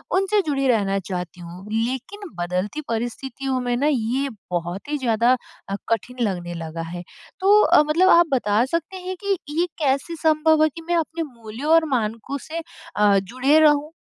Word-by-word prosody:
उनसे 390 Hz, +2 st, +2 dB
जुड़े 275 Hz, -2 st, 0 dB
रहना 200 Hz, -5 st, +2 dB
चाहती 180 Hz, -1 st, -6 dB
हूँ। 175 Hz, +2 st, -10 dB
लेकिन 255 Hz, -, -2 dB, 0.2 s
बदलती 180 Hz, +11 st, -2 dB
परिस्थितियों 255 Hz, +3 st, -3 dB
में 245 Hz, -1 st, -1 dB
ना 285 Hz, +3 st, +1 dB
ये 260 Hz, +3 st, 0 dB, 0.2 s
बहुत 175 Hz, +6 st, -3 dB
ही 300 Hz, -, 0 dB
ज़्यादा 235 Hz, -1 st, +2 dB, 0.4 s
अ, 195 Hz, -, -1 dB
कठिन 240 Hz, +3 st, -2 dB
लगने 175 Hz, -2 st, -4 dB
लगा 165 Hz, 0 st, -6 dB
है। 175 Hz, +2 st, -6 dB, 0.4 s
तो 405 Hz, +3 st, +5 dB
अ, -, -, +6 dB
मतलब 335 Hz, +5 st, +3 dB
आप 345 Hz, 0 st, +7 dB
बता 215 Hz, -2 st, +2 dB
सकते 335 Hz, +6 st, -3 dB
हैं 370 Hz, +1 st, -5 dB
कि 395 Hz, -2 st, +1 dB, 0.2 s
ये 350 Hz, -, +3 dB
कैसे 280 Hz, +3 st, 0 dB
संभव 315 Hz, 0 st, +3 dB
है 310 Hz, -, +4 dB
कि 330 Hz, +3 st, -10 dB
मैं 345 Hz, -, +1 dB
अपने 330 Hz, 0 st, -1 dB
मूल्यों 240 Hz, +2 st, -5 dB
और 330 Hz, -1 st, +5 dB
मानकों 225 Hz, +4 st, -2 dB
से 330 Hz, +1 st, -4 dB, 0.3 s
अ, 205 Hz, -1 st, +4 dB
जुड़े 255 Hz, +10 st, +2 dB
रहूँ। 300 Hz, 0 st, +4 dB
260 Hz, 175 wpm, -22 LUFS, 210-315 Hz, 0.4 s, आप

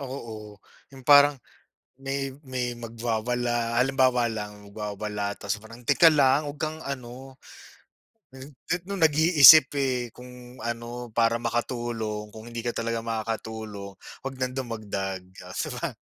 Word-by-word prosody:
Ako, 135 Hz, -2 st, -6 dB
oo, 110 Hz, -5 st, -8 dB, 0.5 s
yung 135 Hz, -1 st, -13 dB
parang 145 Hz, +1 st, +7 dB, 0.6 s
may 135 Hz, 0 st, -3 dB, 0.2 s
may 125 Hz, -1 st, -2 dB
magwawala, 120 Hz, 0 st, -2 dB
halimbawa 130 Hz, -1 st, +3 dB
lang, 105 Hz, -1 st, -8 dB
magwawala, 105 Hz, -1 st, -4 dB
tapos 100 Hz, 0 st, -3 dB
parang 115 Hz, +3 st, -13 dB
teka 145 Hz, +7 st, +6 dB
lang, 145 Hz, -1 st, +3 dB
huwag 145 Hz, -, -7 dB
kang 155 Hz, +2 st, -3 dB
ano, 130 Hz, 0 st, -7 dB, 1.0 s
n 135 Hz, +2 st, -10 dB
n 165 Hz, +6 st, -4 dB
noong 195 Hz, -1 st, -5 dB
nag-iisip 155 Hz, -2 st, +8 dB
eh, 125 Hz, -3 st, -1 dB
kung 125 Hz, +1 st, -13 dB
ano, 120 Hz, +1 st, -5 dB
para 115 Hz, 0 st, +3 dB
makatulong 115 Hz, -3 st, -3 dB
kung 110 Hz, +2 st, -10 dB
hindi 115 Hz, 0 st, -5 dB
ka 120 Hz, -, -1 dB
talaga 115 Hz, 0 st, -1 dB
makakatulong, 110 Hz, -3 st, -5 dB, 0.3 s
huwag 135 Hz, 0 st, -6 dB
nang 130 Hz, 0 st, -2 dB
dumagdag. 100 Hz, -6 st, -4 dB, 0.2 s
Oh, -, -, -10 dB
di -, -, -2 dB
ba? -, -, -2 dB
120 Hz, 140 wpm, -26 LUFS, 110-135 Hz, 1.0 s, nag-iisip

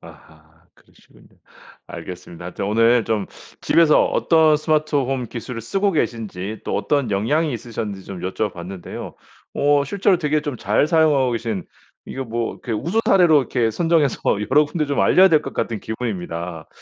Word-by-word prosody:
아하 80 Hz, +1 st, -18 dB
그러시군요. -, -, -23 dB, 0.6 s
알겠습니다. 90 Hz, -1 st, -9 dB
하여튼 90 Hz, +2 st, -5 dB
오늘 115 Hz, +2 st, +3 dB
좀 110 Hz, -3 st, -1 dB, 0.3 s
집에서 165 Hz, -2 st, +4 dB
어떤 160 Hz, -2 st, +3 dB
스마트홈 145 Hz, -5 st, 0 dB
기술을 115 Hz, +1 st, -7 dB
쓰고 195 Hz, -, 0 dB
계신지 110 Hz, -, -3 dB
또 -, -, -2 dB
어떤 140 Hz, -7 st, 0 dB
영향이 145 Hz, +11 st, 0 dB
있으셨는지 110 Hz, -4 st, -6 dB
좀 95 Hz, -3 st, -8 dB
여쭤 100 Hz, +3 st, -2 dB
봤는데요. 90 Hz, +1 st, -8 dB, 0.4 s
어 145 Hz, 0 st, +2 dB
실제로 195 Hz, +3 st, +1 dB
되게 150 Hz, -2 st, 0 dB
좀 145 Hz, -4 st, -4 dB
잘 105 Hz, +7 st, +1 dB
사용하고 155 Hz, -6 st, +3 dB
계신 110 Hz, -5 st, -3 dB, 0.4 s
이거 135 Hz, 0 st, -5 dB
뭐 115 Hz, 0 st, -3 dB
이렇게 115 Hz, -, -7 dB
우수 170 Hz, -, 0 dB
사례로 175 Hz, -5 st, +5 dB
이렇게 120 Hz, -3 st, 0 dB
선정해서 165 Hz, -1 st, +1 dB, 0.3 s
여러 150 Hz, +3 st, +5 dB
군데 150 Hz, +1 st, -2 dB
좀 140 Hz, -, 0 dB
알려야 190 Hz, +1 st, +6 dB
될 155 Hz, -4 st, +4 dB
것 -, -, -7 dB
같은 110 Hz, -3 st, -2 dB
기분입니다. 90 Hz, -7 st, -5 dB
125 Hz, 365 characters per minute, -21 LUFS, 105-150 Hz, 0.6 s, 알려야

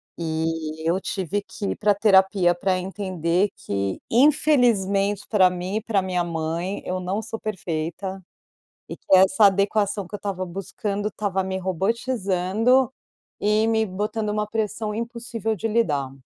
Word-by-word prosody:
E 160 Hz, -1 st, -3 dB
eu 185 Hz, +3 st, +1 dB
tive 195 Hz, +1 st, -2 dB
que 200 Hz, -, -7 dB
ir -, -, -3 dB
pra 205 Hz, -1 st, +2 dB
terapia 190 Hz, -3 st, +4 dB
pra 185 Hz, +1 st, 0 dB
entender 185 Hz, -1 st, -1 dB
que, 100 Hz, -1 st, -3 dB
infelizmente, 230 Hz, -8 st, +3 dB
pra 190 Hz, -4 st, +5 dB
mim 180 Hz, +3 st, -3 dB
e -, -, -2 dB
pra 205 Hz, -5 st, +1 dB
minha 180 Hz, -2 st, 0 dB
mãe 170 Hz, +3 st, -3 dB
eu 185 Hz, 0 st, -2 dB
não 185 Hz, +3 st, -2 dB
sou 225 Hz, 0 st, -6 dB
perfeita, 190 Hz, -1 st, -4 dB, 0.7 s
e -, -, -6 dB
que 190 Hz, -, +3 dB
essa 190 Hz, +3 st, +5 dB
adequação 200 Hz, 0 st, +2 dB
que 205 Hz, -, -7 dB
eu -, -, -4 dB
estava 195 Hz, -2 st, -3 dB
buscando 200 Hz, +3 st, -4 dB
estava 195 Hz, -2 st, -2 dB
me 190 Hz, 0 st, -3 dB
robotizando, 210 Hz, +4 st, +1 dB, 0.5 s
e 215 Hz, +2 st, +2 dB
me 220 Hz, -1 st, +2 dB
botando 210 Hz, +3 st, -3 dB
uma 210 Hz, 0 st, -1 dB
pressão 215 Hz, 0 st, -2 dB
impossível 230 Hz, -1 st, -3 dB
de 225 Hz, +3 st, -2 dB
lidar. 150 Hz, -, 0 dB
195 Hz, 150 wpm, -23 LUFS, 180-215 Hz, 0.7 s, pra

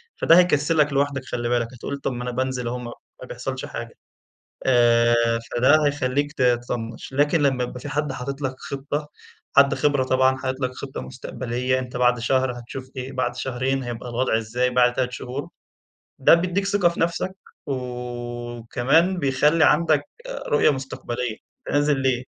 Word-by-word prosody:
فده 165 Hz, -, +5 dB
هيكسّلَك 150 Hz, -3 st, +3 dB
لوحدَك 140 Hz, -1 st, 0 dB
خلِّ 120 Hz, -2 st, -3 dB
بالك، 120 Hz, -1 st, +1 dB
هتقول 135 Hz, +3 st, -5 dB
طب 140 Hz, -, -3 dB
ما 120 Hz, -, -5 dB
أنا 125 Hz, -, -3 dB
بانزل 130 Hz, -1 st, -2 dB
أهو 125 Hz, -, -2 dB
ما 120 Hz, -1 st, -7 dB, 0.3 s
ما -, -, -8 dB
بيحصلش -, -, -5 dB
حاجة، -, -, -7 dB, 0.7 s
آآ 120 Hz, -2 st, +5 dB, 0.4 s
فده 145 Hz, +5 st, +5 dB
هيخلّيك 145 Hz, 0 st, 0 dB
تطنّش، 120 Hz, -3 st, -1 dB
لكن 145 Hz, +2 st, +3 dB
لمّا 130 Hz, -3 st, +2 dB
يبقى 125 Hz, +1 st, -7 dB
في 145 Hz, -, -7 dB
حد 150 Hz, -1 st, -1 dB
حاطط 135 Hz, +2 st, -5 dB
لَك 130 Hz, -1 st, -1 dB
خطّة، 145 Hz, +2 st, -4 dB, 0.5 s
حد 140 Hz, 0 st, +6 dB
خِبرة 145 Hz, -3 st, +2 dB
طبعًا 130 Hz, 0 st, +3 dB
حاطط 130 Hz, 0 st, -4 dB
لَك 130 Hz, -1 st, 0 dB
خطّة 135 Hz, -1 st, -6 dB
مستقبلية، 125 Hz, 0 st, -3 dB
أنت 125 Hz, -1 st, -6 dB
بعد 125 Hz, 0 st, +3 dB
شهر 130 Hz, +2 st, +1 dB
هتشوف 130 Hz, +2 st, -8 dB
إيه، 130 Hz, +1 st, -5 dB
بعد 130 Hz, -1 st, -2 dB
شهرين 130 Hz, +1 st, -1 dB
هيبقى 120 Hz, 0 st, -6 dB
الوضع 120 Hz, -1 st, +1 dB
إزاي، 120 Hz, +3 st, -1 dB
بعد 125 Hz, 0 st, +4 dB
3 125 Hz, -1 st, -1 dB
شهور. 130 Hz, +5 st, -5 dB, 0.7 s
ده 135 Hz, -, +7 dB
بيدّيك 180 Hz, +3 st, 0 dB
ثقة 200 Hz, -3 st, +3 dB
في 170 Hz, -, -5 dB
نفسك، 170 Hz, +3 st, -1 dB, 0.3 s
وكمان 125 Hz, +5 st, -1 dB
بيخَلّي 150 Hz, +2 st, +3 dB
عندك 155 Hz, -2 st, +4 dB, 0.5 s
رؤية 145 Hz, -, +4 dB
مستقبلية، 125 Hz, -3 st, -4 dB, 0.3 s
أنت -, -, -2 dB
نازل 145 Hz, 0 st, +3 dB
ليه، 130 Hz, -1 st, +1 dB
130 Hz, 160 wpm, -23 LUFS, 125-145 Hz, 0.7 s, ده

